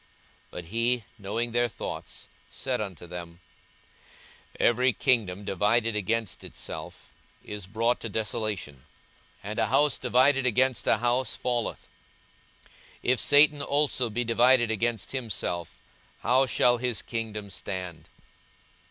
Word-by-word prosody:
42:011:017 -, -, -33 dB, 0.4 s
But 90 Hz, -, -8 dB
he, 115 Hz, +5 st, 0 dB, 0.2 s
knowing 110 Hz, +4 st, -2 dB
their 120 Hz, +1 st, +2 dB
thoughts, -, -, -7 dB, 0.2 s
said 130 Hz, -4 st, -2 dB
unto 95 Hz, -5 st, -6 dB
them, 85 Hz, -1 st, -8 dB, 1.2 s
Every 125 Hz, +2 st, +3 dB
kingdom 105 Hz, -4 st, +1 dB
divided 110 Hz, +4 st, +1 dB
against 110 Hz, -1 st, -2 dB
itself -, -, -8 dB, 0.3 s
is 105 Hz, -3 st, -7 dB
brought 115 Hz, +4 st, +1 dB
to 115 Hz, -, -5 dB
desolation; 105 Hz, -, -3 dB, 0.6 s
and 105 Hz, +2 st, -4 dB
a -, -, +2 dB
house 145 Hz, +2 st, +3 dB
divided 130 Hz, +2 st, +3 dB
against 125 Hz, -2 st, +1 dB
a -, -, +5 dB
house 120 Hz, +3 st, 0 dB
falleth. 120 Hz, -2 st, -2 dB, 1.2 s
42:011:018 125 Hz, -, +3 dB
If 130 Hz, -, -2 dB
Satan 145 Hz, 0 st, +5 dB
also 140 Hz, -4 st, +1 dB
be 120 Hz, +3 st, -1 dB
divided 120 Hz, 0 st, +4 dB
against 115 Hz, 0 st, -1 dB
himself, 105 Hz, -, -3 dB, 0.4 s
how 130 Hz, +3 st, +3 dB
shall 120 Hz, 0 st, +3 dB
his 120 Hz, -2 st, -1 dB
kingdom 110 Hz, -3 st, -4 dB
stand? 90 Hz, -6 st, -5 dB
115 Hz, 125 wpm, -27 LUFS, 105-125 Hz, 1.2 s, a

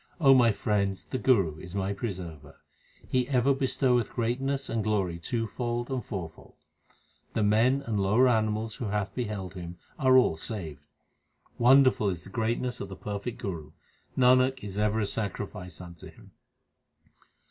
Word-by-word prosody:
O 135 Hz, -4 st, +7 dB
my 120 Hz, -3 st, +5 dB
friends, 100 Hz, -2 st, -1 dB
the 130 Hz, -, -4 dB
Guru 95 Hz, -, +2 dB
is 90 Hz, +3 st, -9 dB
my 100 Hz, 0 st, -1 dB
preserver. 90 Hz, -, -7 dB, 0.5 s
He 125 Hz, -1 st, +1 dB
ever 135 Hz, 0 st, +3 dB
bestoweth 130 Hz, -3 st, +1 dB
greatness 135 Hz, +4 st, -1 dB
and 115 Hz, -2 st, -1 dB
glory 95 Hz, -5 st, 0 dB
twofold 120 Hz, +5 st, -3 dB
and 130 Hz, -3 st, -2 dB
four 95 Hz, -5 st, -4 dB
fold. 80 Hz, -, -18 dB, 0.8 s
The 110 Hz, -, +2 dB
men 115 Hz, +7 st, +3 dB
and 110 Hz, -3 st, -1 dB
lower 105 Hz, +7 st, +4 dB
animals 110 Hz, -2 st, +1 dB
who 120 Hz, -, -4 dB
have 100 Hz, -2 st, -2 dB
beheld 105 Hz, -6 st, -4 dB
him 90 Hz, -2 st, -8 dB, 0.2 s
are 130 Hz, -2 st, +5 dB
all 125 Hz, -11 st, +4 dB
saved. 80 Hz, -7 st, -6 dB, 0.8 s
Wonderful 130 Hz, -3 st, +5 dB
is 90 Hz, -3 st, -4 dB
the 95 Hz, -, -12 dB
greatness 120 Hz, +3 st, -1 dB
of 100 Hz, -, -5 dB
the 95 Hz, -, -7 dB
perfect 105 Hz, +4 st, -5 dB
Guru; 85 Hz, -7 st, -6 dB, 0.4 s
Nanak 130 Hz, 0 st, +4 dB
is 100 Hz, -2 st, -6 dB
ever 105 Hz, +1 st, +1 dB
a -, -, +1 dB
sacrifice 100 Hz, -3 st, -4 dB
unto 85 Hz, -3 st, -10 dB
him. -, -, -17 dB
110 Hz, 155 wpm, -28 LUFS, 95-125 Hz, 0.8 s, O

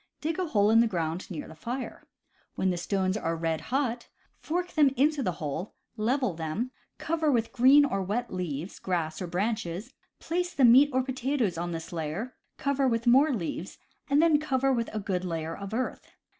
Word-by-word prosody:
Dig 320 Hz, +3 st, -2 dB
a 365 Hz, -, 0 dB
hole 210 Hz, -7 st, +3 dB
in 225 Hz, -, +6 dB
the 235 Hz, -, +5 dB
ground 170 Hz, -3 st, -3 dB
near 170 Hz, -6 st, -6 dB
the -, -, -10 dB
fire. 240 Hz, -, -6 dB, 0.5 s
When 185 Hz, -, +1 dB
the 175 Hz, -, -2 dB
stones 185 Hz, +2 st, 0 dB
are 165 Hz, -6 st, -1 dB
red 165 Hz, -1 st, -1 dB
hot, 250 Hz, -3 st, -1 dB, 0.3 s
fork 355 Hz, +2 st, -2 dB
them 295 Hz, -3 st, +5 dB
into 295 Hz, +2 st, +3 dB
the 180 Hz, -8 st, 0 dB
hole, 155 Hz, +5 st, -5 dB, 0.2 s
level 240 Hz, 0 st, 0 dB
them, 165 Hz, +10 st, -3 dB, 0.3 s
cover 315 Hz, -2 st, 0 dB
with 230 Hz, -3 st, +1 dB
green 270 Hz, +4 st, +6 dB
or 195 Hz, -8 st, -1 dB
wet 210 Hz, +5 st, -2 dB
leaves, 175 Hz, -1 st, -4 dB
grass, 165 Hz, -3 st, -2 dB
or 180 Hz, -, -3 dB
branches, 205 Hz, +3 st, -2 dB, 0.3 s
place 355 Hz, +1 st, -2 dB
the 270 Hz, -, +5 dB
meat 260 Hz, +5 st, +7 dB
or 260 Hz, 0 st, +1 dB
potatoes 260 Hz, -5 st, -1 dB
on 175 Hz, +1 st, -3 dB
this 165 Hz, +2 st, -6 dB
layer, 165 Hz, +10 st, -4 dB, 0.2 s
cover 280 Hz, -1 st, +1 dB
with 230 Hz, -1 st, 0 dB
more 270 Hz, +6 st, +5 dB
leaves, 185 Hz, -5 st, -4 dB, 0.3 s
and 285 Hz, +3 st, +4 dB
then 320 Hz, -3 st, +5 dB
cover 270 Hz, -3 st, +1 dB
all -, -, +3 dB
with 230 Hz, -1 st, -1 dB
a 220 Hz, -, -4 dB
good 190 Hz, -3 st, -2 dB
layer 165 Hz, -2 st, -3 dB
of 200 Hz, 0 st, -7 dB
earth. 250 Hz, +3 st, -3 dB
225 Hz, 195 wpm, -28 LUFS, 175-270 Hz, 0.5 s, meat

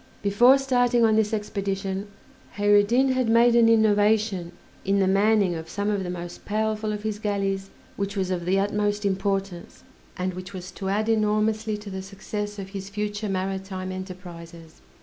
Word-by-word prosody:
Before 240 Hz, +7 st, +6 dB
starting 245 Hz, -3 st, +2 dB
on 220 Hz, -1 st, +3 dB
this 215 Hz, -1 st, +2 dB
expedition 200 Hz, -2 st, -3 dB, 0.5 s
Kheyr 205 Hz, 0 st, +5 dB
ed 205 Hz, -, +2 dB
Din 260 Hz, +4 st, +3 dB
had 255 Hz, -3 st, +1 dB
made 235 Hz, +1 st, +5 dB
an 230 Hz, -1 st, +6 dB
innovation 210 Hz, -4 st, +2 dB, 0.3 s
in 200 Hz, +1 st, +1 dB
the 195 Hz, -, +3 dB
manning 200 Hz, 0 st, +3 dB
of 160 Hz, -1 st, -6 dB
some 205 Hz, +1 st, -1 dB
of 200 Hz, -2 st, -1 dB
the 180 Hz, -, -4 dB
most 175 Hz, -1 st, -7 dB
powerful 215 Hz, 0 st, -1 dB
of 210 Hz, 0 st, -5 dB
his 215 Hz, -1 st, -3 dB
galleys, 195 Hz, -2 st, -2 dB, 0.3 s
which 200 Hz, +1 st, -3 dB
was 190 Hz, -1 st, -1 dB
of 175 Hz, -2 st, -2 dB
the 190 Hz, +2 st, +2 dB
utmost 205 Hz, +1 st, 0 dB
importance, 195 Hz, -2 st, -2 dB, 0.3 s
and 185 Hz, 0 st, -2 dB
which 185 Hz, +1 st, -8 dB
was 185 Hz, 0 st, -7 dB
to 190 Hz, +1 st, -5 dB
add 210 Hz, +2 st, 0 dB
enormously 215 Hz, 0 st, +1 dB
to 210 Hz, -1 st, -9 dB
the 190 Hz, 0 st, -4 dB
success 205 Hz, +2 st, -6 dB
of 195 Hz, -1 st, -6 dB
his 195 Hz, -1 st, -7 dB
future 210 Hz, +1 st, -3 dB
maritime 190 Hz, 0 st, -3 dB
enterprises. 175 Hz, -3 st, -9 dB
200 Hz, 175 wpm, -25 LUFS, 190-215 Hz, 0.5 s, Before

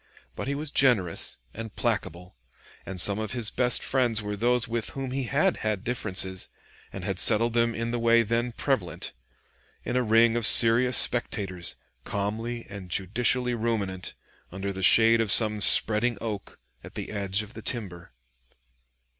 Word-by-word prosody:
But -, -, -6 dB
he 140 Hz, -, -2 dB
was 150 Hz, +1 st, -4 dB
generous 105 Hz, -11 st, +1 dB, 0.2 s
and 115 Hz, -1 st, -8 dB
placable, 90 Hz, -, -3 dB, 0.5 s
and 95 Hz, -1 st, -7 dB
some 100 Hz, +3 st, -1 dB
of 110 Hz, +1 st, -4 dB
his 120 Hz, -4 st, -1 dB
best 125 Hz, -1 st, +1 dB
friends 125 Hz, -4 st, +2 dB
were 105 Hz, -1 st, -4 dB
those 120 Hz, +3 st, +1 dB
with 115 Hz, -1 st, -3 dB
whom 135 Hz, -1 st, -4 dB
he 135 Hz, 0 st, -3 dB
had 155 Hz, +9 st, +1 dB
had 105 Hz, -2 st, -3 dB
differences, 95 Hz, -6 st, -2 dB, 0.4 s
and -, -, -8 dB
had -, -, -3 dB
settled 115 Hz, +2 st, +5 dB
them 115 Hz, -1 st, +1 dB
in 115 Hz, 0 st, -3 dB
the 120 Hz, -, -2 dB
way 115 Hz, 0 st, +4 dB
then 115 Hz, +2 st, -1 dB
prevalent, -, -, -3 dB, 0.7 s
in 120 Hz, -, -3 dB
a 125 Hz, -, +2 dB
ring 115 Hz, 0 st, +3 dB
of 120 Hz, -2 st, +4 dB
serious 120 Hz, +2 st, +5 dB
spectators, 95 Hz, -7 st, 0 dB, 0.3 s
calmly 115 Hz, +4 st, -4 dB
and 100 Hz, -2 st, -10 dB
judicially 120 Hz, +7 st, 0 dB
ruminant, 105 Hz, -5 st, -3 dB, 0.4 s
under 100 Hz, +2 st, -5 dB
the 95 Hz, -, -7 dB
shade 115 Hz, +4 st, +6 dB
of 110 Hz, -, +2 dB
some 105 Hz, -2 st, +4 dB
spreading 110 Hz, +3 st, +3 dB
oak, 105 Hz, -3 st, -6 dB, 0.3 s
at -, -, -13 dB
the -, -, -6 dB
edge 100 Hz, 0 st, -2 dB
of 105 Hz, +3 st, -13 dB
the -, -, -9 dB
timber. 95 Hz, -8 st, -6 dB
115 Hz, 165 wpm, -26 LUFS, 100-120 Hz, 0.7 s, shade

